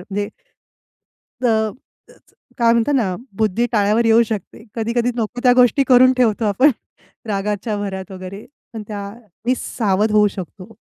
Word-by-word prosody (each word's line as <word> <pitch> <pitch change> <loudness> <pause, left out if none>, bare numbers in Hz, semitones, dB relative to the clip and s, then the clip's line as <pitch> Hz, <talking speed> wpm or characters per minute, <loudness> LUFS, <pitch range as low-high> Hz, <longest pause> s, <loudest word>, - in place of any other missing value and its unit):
अ, - - -12
म्हणजे 205 +1 -2 1.2
तर 220 -2 +2 0.9
काय 235 -2 +4
म्हणतात 235 +5 +1
ना, 200 -8 0 0.2
बुद्धी 220 +2 +1
टाळ्यावर 215 +1 +2
येऊ 225 +1 +5
शकते, 220 -1 -6
कधी-कधी 235 +1 0
नको 235 +1 -3
त्या 250 -1 +6
गोष्टी 250 +2 +4
करून 255 0 +6
ठेवतो 230 -3 +2
आपण 235 +8 +4 0.6
रागाच्या 210 +1 -2
भरात 190 -2 -5
वगैरे 185 +2 -9 0.3
पण 225 -2 -6
त्यानी 210 +3 -5
सावध 210 -1 0
होऊ 210 -1 +5
शकतो. 190 +2 -10
220 Hz, 140 wpm, -19 LUFS, 200-235 Hz, 1.2 s, त्या